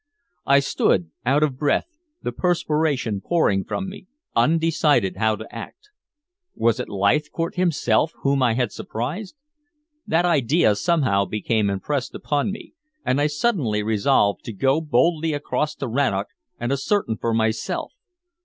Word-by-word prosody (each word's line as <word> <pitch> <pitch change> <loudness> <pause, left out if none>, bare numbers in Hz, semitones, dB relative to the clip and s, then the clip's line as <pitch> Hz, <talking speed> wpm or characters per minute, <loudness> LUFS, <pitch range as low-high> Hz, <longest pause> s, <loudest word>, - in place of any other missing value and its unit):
I 140 0 +5
stood 90 -10 +1 0.2
out 140 +4 +3
of 135 -4 -1
breath, 145 -2 +1 0.4
the - - -2
perspiration 150 - 0
pouring 100 - +2
from 190 - -4
me, 190 -1 -10 0.3
undecided 150 - +2
how 110 -1 +2
to - - -10
act. 420 - -10 0.6
Was 115 +1 +1
it 125 - -4
Leithcourt 150 - 0
himself 165 -3 +1
whom 140 -1 +2
I 120 -3 +3
had 125 -3 0
surprised? 155 - -5 0.7
That 165 +2 +2
idea 150 -6 +3
somehow 100 -5 +2
became 105 0 0
impressed 125 +7 -2
upon 145 +6 -1
me 205 - -9 0.3
and 135 +3 +1
I 145 - +3
suddenly 150 - 0
resolved 105 -1 +2
to 115 - -5
go 135 +9 +2
boldly 155 +3 +1
across 150 +1 -2
to 135 - -4
Rannoch 115 -5 0 0.3
and 120 +2 -2
ascertain 140 - 0
for 115 - -1
myself. 110 0 -1
140 Hz, 140 wpm, -23 LUFS, 110-160 Hz, 0.7 s, I